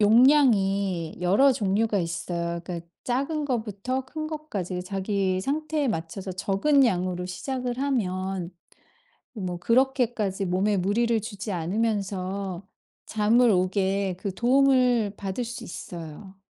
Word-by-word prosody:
용량이 205 - +4
여러 205 +10 +5
종류가 210 -1 +1
있어요. 170 -1 -3
그러니까 170 -1 -6 0.2
작은 280 +5 -1
거부터 245 0 -2
큰 310 +4 -5
거까지 205 - -4
자기의 190 0 -1
상태에 300 +3 -1
맞춰서 185 0 -4
적은 200 +10 +3
양으로 180 -4 0
시작을 245 +7 -4
하면 190 -9 -1 0.8
뭐 185 -5 -4
그렇게까지 235 -3 +1
몸에 190 +3 +1
무리를 225 +5 +1
주지 205 -1 -5
않으면서 195 0 -2 0.4
잠을 225 +3 +3
오게 190 0 +1
그 195 -1 -4
도움을 250 -4 +3
받을 200 +4 -3
수 235 +1 -7
있어요. 175 +3 -9
200 Hz, 270 characters per minute, -26 LUFS, 185-245 Hz, 0.8 s, 여러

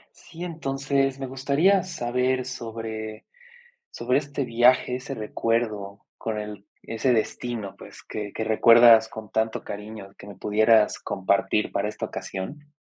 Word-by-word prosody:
Sí, 170 +1 -10
entonces, 135 -4 -1
me 135 - -4
gustaría 140 +9 +2
saber 130 -6 -1
sobre 115 -3 -6 0.7
sobre 125 +3 +1
este 140 -1 -4
viaje, 125 +1 +3
ese 130 +2 -6
recuerdo 105 -2 -2
con 110 -1 -3
el 105 -1 -8 0.2
ese 115 +3 0
destino, 110 -3 -2
pues, - - -13
que 105 -1 -6
que 110 - -3
recuerdas 115 +1 +7
con 110 -2 -9
tanto 110 0 -1
cariño 105 -1 -8
que 100 - -12
me 100 - -9
pudieras 110 +2 +3
compartir 100 +2 0
para 100 +1 -1
esta - - -5
ocasión. 145 +10 -7
115 Hz, 135 wpm, -25 LUFS, 105-130 Hz, 0.7 s, recuerdas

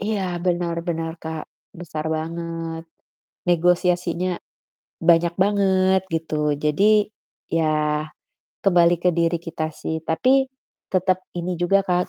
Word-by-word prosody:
Iya 210 0 -1 0.2
benar 175 -1 0
benar 165 -1 -1
Kak, 160 -1 -5 0.4
besar 155 -3 -5
banget. 165 0 -4 0.7
Negosiasinya 180 0 +2 0.7
banyak 170 0 +4
banget 190 -2 +3
gitu. 155 -2 0
Jadi 150 +6 +1 0.7
ya 155 -1 +1 0.6
kembali 175 -3 +5
ke 180 - +4
diri 170 0 +1
kita 165 -1 -4
sih, 160 0 -3
tapi 260 +11 +3 0.5
tetep 185 0 +2 0.2
ini 175 +1 -2
juga 195 +3 +3
Kak, 180 -1 +1
170 Hz, 110 wpm, -23 LUFS, 160-180 Hz, 0.7 s, kembali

